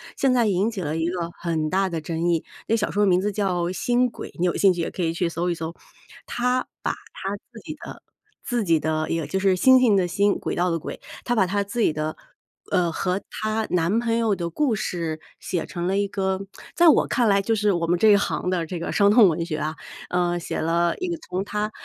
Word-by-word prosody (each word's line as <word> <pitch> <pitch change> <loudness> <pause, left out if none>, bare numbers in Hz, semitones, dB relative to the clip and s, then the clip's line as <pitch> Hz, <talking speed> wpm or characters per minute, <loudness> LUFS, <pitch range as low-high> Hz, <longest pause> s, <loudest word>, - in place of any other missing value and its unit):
现 270 - +2
在 245 -2 +3
引 200 +1 +2
起 215 -5 -5
了 155 -2 -2
一 165 +1 0
个 175 -2 -3
很 160 -2 -1
大 190 +1 +2
的 165 -2 -3
争 165 +2 -2
议， 165 -2 +1 0.2
这 225 - +2
小 210 - -1
说 205 - 0
的 - - +4
名 180 0 +4
字 205 +2 -1
叫 190 -4 0
《星 245 +6 +2
轨》， 240 - -8
你 175 - +2
有 175 - +1
兴 195 - +5
趣 175 -1 -2
也 - - -3
可 - - -5
以 165 -2 +1
去 175 0 0
搜 170 +1 -2
一 175 - 0
搜。 165 0 -5 0.5
她 250 +1 0 0.2
把 - - +1
她 195 +1 -6 0.2
自 230 - -11
己 310 - -7
的 - - -9 0.4
自 240 -3 0
己 165 -2 +4
的 155 +1 -1
也 165 -2 -1
就 190 +7 -2
是 190 -1 +3
星 260 +7 +6
星 235 -5 +4
的 190 -2 +3
星， 200 +3 +2
轨 - - -3
道 180 +1 +1
的 165 - 0
轨， 160 - -7 0.2
她 240 - 0
把 200 -6 +3
她 200 +2 0
自 200 +4 -5
己 210 - +3
的， 155 +1 -3 0.6
呃， 175 -2 +2
和 185 +3 -1
她 215 0 -2
男 180 +5 +2
朋 230 -1 0
友 225 -3 +2
的 170 -2 -3
故 260 - +1
事 165 -5 -3 0.2
写 175 - -3
成 175 0 -4
了 195 +1 +1
一 200 0 +1
个 190 0 -2 0.3
在 345 - +5
我 - - +4
看 245 -3 +2
来 200 0 +4
就 225 +3 0
是 210 -1 +2
我 170 -3 0
们 175 +1 +2
这 215 +5 +5
一 205 - +7
行 190 -2 -1
的 180 -3 0
这 175 +1 -5
个 - - -3
伤 200 -1 +4
痛 215 -3 +7
文 165 0 -1
学 160 -3 -3
啊。 155 +1 -3 0.3
嗯， 175 -1 +1
写 170 - -4
了 170 +1 +1
一 370 - -2
个 345 -1 -2
从 185 +2 -1
她， 210 +1 -2
185 Hz, 270 characters per minute, -24 LUFS, 170-210 Hz, 0.6 s, 一